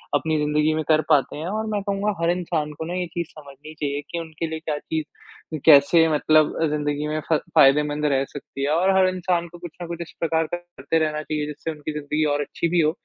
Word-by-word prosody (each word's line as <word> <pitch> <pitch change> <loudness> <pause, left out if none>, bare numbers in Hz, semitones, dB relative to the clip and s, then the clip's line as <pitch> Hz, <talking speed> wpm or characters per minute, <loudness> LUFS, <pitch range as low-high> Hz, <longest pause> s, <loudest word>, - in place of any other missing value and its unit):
अपनी 155 +2 +1
ज़िंदगी 150 +1 +2
में 155 - -1
कर 155 0 +5
पाते 145 -4 +3
हैं 155 +3 -4
और 215 +3 -2
मैं 205 - 0
कहूँगा 200 +1 -1
हर 170 - +3
इंसान 165 -4 -2
को 160 +2 -6
ना 170 - -4
ये 180 -1 -1
चीज़ 170 -2 -2
समझनी 145 +1 -12
चाहिए 145 -1 -2
कि 170 - -2
उनके 165 0 -5
लिए 160 0 -5
क्या 155 -2 -3
चीज़ 160 0 -3 0.6
कैसे 160 +2 +7
मतलब 155 0 +3 0.2
ज़िंदगी 150 0 -1
में 155 0 -1
फ़ा 160 - +4 0.2
फ़ायदेमंद 150 +2 +4
रह 135 0 +2
सकती 140 0 -8
है 140 - +1
और 180 +5 +3
हर 190 -1 +5
इंसान 180 -2 -1
को 175 +1 -13
कुछ 175 -2 -8
न 175 - -5
कुछ 170 0 -6
इस 170 - -7
प्रकार 165 0 +1
का 175 - -3
करते 175 -3 -3
रहना 155 -1 -1
चाहिए 150 -1 -2
जिससे 150 +2 -5
उनकी 150 0 -6
ज़िंदगी 150 +1 -1
और 145 - 0
अच्छी 155 +3 -2
भी 175 +1 +2
हो। 155 0 +3
155 Hz, 235 wpm, -23 LUFS, 150-170 Hz, 0.6 s, कैसे